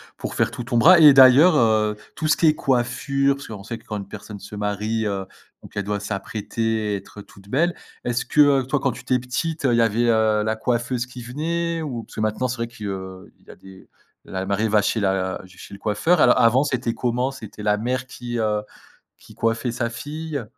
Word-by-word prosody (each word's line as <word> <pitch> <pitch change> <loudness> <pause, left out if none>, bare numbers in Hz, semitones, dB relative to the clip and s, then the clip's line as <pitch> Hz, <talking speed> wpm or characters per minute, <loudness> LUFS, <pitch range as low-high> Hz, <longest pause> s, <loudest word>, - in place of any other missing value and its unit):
pour - - -6
faire - - +1
tout 120 - -6
ton 120 0 -1
bras 170 +8 +7
et 150 -2 +10
d'ailleurs, 135 +5 +7
heu, 110 -3 +2 0.2
tout 155 - -2
ce 155 - +4
qui 165 - +3
est 155 - +4
coiffure, 135 +2 0
parce 140 - -10
qu'on 105 -3 -8
sait 115 +1 -5
que - - -20
quand 105 - -4
une 100 -1 -7
personne 105 0 -9
se 105 +1 -10
marie, 105 +2 -2
heu, 100 -2 -2 0.4
donc - - -14
elle 100 - -1
doit 105 +1 -2
s'apprêter, 105 +2 -3
et - - 0
être 100 +1 -9
toute 100 0 -17
belle. 170 +7 +1 0.3
Est-ce 120 0 0
que, - - -2 0.2
heu, - - -4
toi, 140 +3 0
quand 135 -3 0
tu 120 - -10
étais 130 -1 0
petite, 145 +5 -3
heu, 125 - +3
il - - +3
y 115 - +4
avait, 115 +1 +2
heu, 110 -2 +2
la 110 0 0
coiffeuse 120 +2 -1
qui 125 -1 -10
venait? 165 +6 -2
Ou 125 -7 -5
parce - - -15
que - - -3
maintenant, 110 +4 0
c'est 125 - -3
vrai 115 0 -3
qu'il 110 -3 -8 0.6
y - - -21
a - - -14
des 95 -1 -15 0.3
la 95 0 -5
mariée 100 +3 0
va 105 0 +4
chez 110 - 0
la 95 -1 0
ch 95 0 -18
chez - - -12
le 100 - -10
coiffeur. 150 - +1
Alors 125 - +5
avant, 120 +4 +4
c'était 125 -5 -1
comment? 125 +3 -1
C'était 110 -5 -10
la 105 0 +2
mère 125 +3 -2
qui, 120 -1 -6
heu, 105 -1 0 0.6
qui - - -17
coiffait 115 +1 -1
sa 120 0 -2
fille? 150 +3 -5
115 Hz, 235 wpm, -22 LUFS, 105-130 Hz, 0.6 s, et